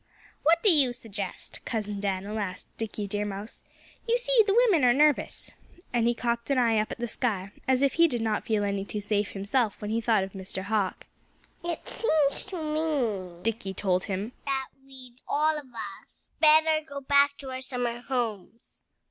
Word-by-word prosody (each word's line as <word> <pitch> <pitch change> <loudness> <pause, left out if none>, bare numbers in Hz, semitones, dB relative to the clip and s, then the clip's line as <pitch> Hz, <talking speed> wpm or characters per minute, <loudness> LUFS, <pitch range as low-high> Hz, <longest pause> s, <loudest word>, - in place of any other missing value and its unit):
"What 335 +2 +3
do 420 - +7
you 275 -6 +5
suggest?" 205 -5 -6
Cousin 210 -3 -3
Dan'l 200 +2 -2
asked 190 -2 -5
Dickie 215 -2 -3
Deer 205 +1 -1
Mouse. 205 +2 -5 0.5
"You 470 +1 +3
see - - 0
the 400 - +3
women 360 - +3
are 245 -1 +6
nervous." 300 0 +2 0.4
And 235 -1 +2
he 240 - +2
cocked 235 0 -2
an 275 - +2
eye 230 -3 +3
up 215 - -1
at - - -5
the 240 0 -3
sky, 205 -5 -2 0.2
as 260 +1 +3
if 275 - +3
he 335 0 +5
did 245 -6 -2
not 215 -2 0
feel 215 -2 0
any 200 -1 -1
too 200 +2 -4
safe 205 0 -1
himself 205 +3 0
when 210 0 -4
he 230 +1 0
thought 220 -3 +3
of 190 - -6
Mr. 190 -1 -5
Hawk. 200 -2 -1 0.6
"It 340 -1 -4
seems 310 -10 +1
to 385 -1 -6
me," 245 - -1
Dickie 215 -4 -2
told 185 -1 +1
him, 200 +3 -3 0.2
"that 270 -1 -1
we'd 260 -2 -15
all 310 +2 +2
of 295 -3 -7
us 235 -3 -10
better 315 0 +5
go 280 -2 -7
back 280 +1 +4
to 270 -2 -8
our 260 0 -5
summer 245 -3 -2
homes." 230 -4 -4
235 Hz, 190 wpm, -27 LUFS, 205-280 Hz, 0.6 s, do